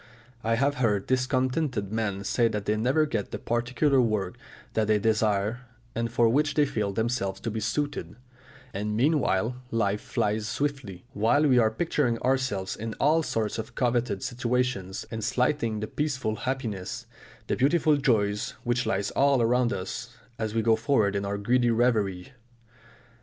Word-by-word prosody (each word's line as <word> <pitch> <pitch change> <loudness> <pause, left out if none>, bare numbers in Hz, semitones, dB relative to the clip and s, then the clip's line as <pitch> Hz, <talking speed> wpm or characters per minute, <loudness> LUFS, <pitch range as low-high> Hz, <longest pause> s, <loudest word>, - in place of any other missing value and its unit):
I 115 0 +2
have 140 +4 +1
heard 105 -5 +2
discontented 130 -3 0
men 105 -3 -2
say 115 +3 +2
that 105 -2 -3
they 105 - +1
never 130 +8 +2
get 110 -9 -3
the - - -4
particular 130 +4 +1
work 110 -4 -1 0.4
that 110 -1 +1
they 110 0 +4
desire 110 +2 0 0.3
and 115 0 -2
for 120 -1 +3
which 145 +5 +2
they 150 - +4
feel 105 -7 -1
themselves 100 -3 -1
to 115 - -3
be 110 - -3
suited; 145 +1 -2 0.6
and 105 +2 -2
meanwhile 125 -5 +1
life 105 -3 0
flies 105 +1 -1
swiftly, 130 -10 -3
while 120 +8 +3
we 125 -3 +5
are 110 -2 +4
picturing 125 -1 0
ourselves 130 -8 0
in 110 0 -5
all 155 +3 +3
sorts 110 -7 -2
of 110 - -7
coveted 120 -5 0
situations, 120 -6 -1
and 110 -1 -4
slighting 115 -1 0
the 110 - -3
peaceful 130 -7 -2
happiness, 115 -7 -4 0.4
the - - -1
beautiful 150 +3 +3
joys 105 -6 +1
which 120 0 0
lie 100 -2 0
all 140 -1 +4
around 120 +1 +2
us, 115 +5 -5 0.2
as 110 -1 -2
we 115 - +1
go 115 0 +4
forward 110 -4 +1
in 100 0 -1
our 100 +1 -2
greedy 120 +4 +2
reverie. 110 -4 +1
115 Hz, 160 wpm, -27 LUFS, 105-130 Hz, 0.6 s, we